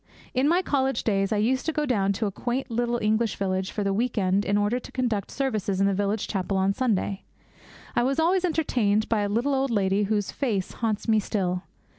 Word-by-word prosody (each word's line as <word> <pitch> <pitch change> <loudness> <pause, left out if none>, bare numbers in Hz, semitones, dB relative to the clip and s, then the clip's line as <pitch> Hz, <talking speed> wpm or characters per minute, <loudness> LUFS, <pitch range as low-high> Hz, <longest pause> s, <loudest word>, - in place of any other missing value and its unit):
In 260 +2 +2
my 350 +4 +3
college 270 -5 0
days 195 -3 +1
I 215 - +2
used 250 +5 +1
to - - +2
go 300 -1 -1
down 200 -7 +1
to 215 - -2
a 200 - -1
quaint 245 +5 -3
little 240 +1 0
English 220 0 +1
village 190 0 -1
for 210 - -3
the 195 0 0
week 235 +3 -1
end 195 0 +2
in 200 +1 +2
order 205 +4 +1
to - - -12
conduct 235 -6 -1
services 215 -8 -1
in 195 - +3
the 200 - +2
village 200 +2 -1
chapel 195 -1 -1
on 190 +1 +2
Sunday. 205 -5 0 0.7
I - - +3
was 270 +4 +1
always 355 +3 +3
entertained 240 - +1
by 225 - +1
a 205 - -1
little 240 +7 +1
old 270 0 +1
lady 200 -2 +1
whose 205 -1 -1
face 215 -9 -1
haunts 220 -2 -2
me 220 -1 +4
still. 185 -3 -1
215 Hz, 220 wpm, -26 LUFS, 200-255 Hz, 0.7 s, me